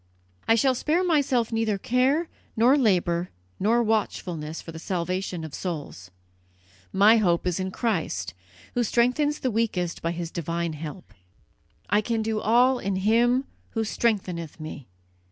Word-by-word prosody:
"I 225 - +5
shall 260 +3 +3
spare 310 +8 +1
myself 275 -9 +2
neither 225 -2 0
care 260 - +1 0.3
nor 240 +5 +5
labour 180 -8 +2 0.3
nor 230 +4 +3
watchfulness 175 -8 -2
for 165 - -9
the 160 - -8
salvation 180 0 -3
of 160 -3 -7
souls. 145 - -5 0.8
My 210 - +6
hope 175 -6 +2
is 180 0 0
in 185 0 -2
Christ, 205 -4 -2 0.4
who 245 - +1
strengthens 250 +7 +1
the 255 - 0
weakest 200 -6 -1
by 165 - -1
His 170 -1 -5
divine 170 0 -2
help; 155 +4 -8 0.7
I 210 - +3
can 225 0 -1
do 220 -1 -1
all 245 +4 +4
in 200 -3 -2
Him 235 +6 +3 0.3
who 225 - 0
strengtheneth 185 -8 -1
me! 155 -3 -8
210 Hz, 145 wpm, -25 LUFS, 170-240 Hz, 0.8 s, My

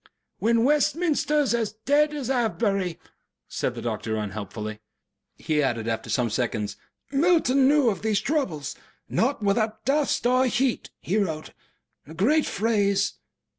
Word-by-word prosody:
"When 230 +1 +2
Westminster 300 +1 +2
is 275 - +1
as 225 -3 -1
dead 295 +2 +3
as 275 -4 -3
Avebury," 205 -7 0 0.5
said - - -2
the - - -6
doctor, 110 -1 -2
unhelpfully. 105 +1 -5 0.6
He 155 -1 0
added 120 -5 -1
after 115 -1 -3
some 120 -3 0
seconds, 110 -3 -2 0.4
"Milton 280 -3 +3
knew 290 -2 +4
of 195 - -6
these 215 -1 +1
troubles. 215 - -2 0.3
'Not 245 -1 0
without 215 +2 0
dust 280 -4 +1
and 255 +1 +3
heat' 255 0 0
he 195 - -1
wrote 160 -6 -3 0.6
a 160 - -10
great 290 - +2
phrase." 205 -3 +1
220 Hz, 135 wpm, -25 LUFS, -, 0.6 s, knew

